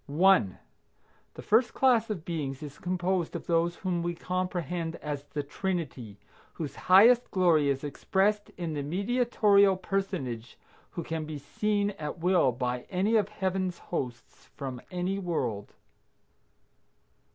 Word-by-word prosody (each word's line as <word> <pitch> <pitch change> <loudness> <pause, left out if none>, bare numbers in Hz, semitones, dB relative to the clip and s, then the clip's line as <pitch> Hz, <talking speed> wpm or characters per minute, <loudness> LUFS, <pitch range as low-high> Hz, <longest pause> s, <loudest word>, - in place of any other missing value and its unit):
1. 155 - +4 0.8
The - - -9
first 230 +3 +3
class 240 -4 +3
of 180 -6 -4
beings 145 -4 -4
is 145 -1 -9
composed 180 -1 -1
of - - -5
those 170 0 +1
whom 180 -3 -2
we 170 0 -2
comprehend 175 -2 -3
as 145 -2 -5
the 145 0 -4
Trinity, 145 - -4 0.4
whose 155 -4 -5
highest 230 +7 +6
glory 170 -6 +3
is 135 0 -1
expressed 195 +8 0
in 170 -3 -3
the 145 - -2
Mediatorial 200 - +3
personage 170 - -3 0.3
who 170 - -5
can 160 -1 -3
be 155 -1 -6
seen 205 +8 -1
at 150 +1 -4
will 175 -5 +3
by 125 0 -3
any 195 +5 +1
of 210 -2 +2
Heaven's 190 -3 -2
hosts 125 -8 -6
from 130 -3 -5
any 180 +2 -2
world. 125 - -3
175 Hz, 135 wpm, -29 LUFS, 145-195 Hz, 0.8 s, highest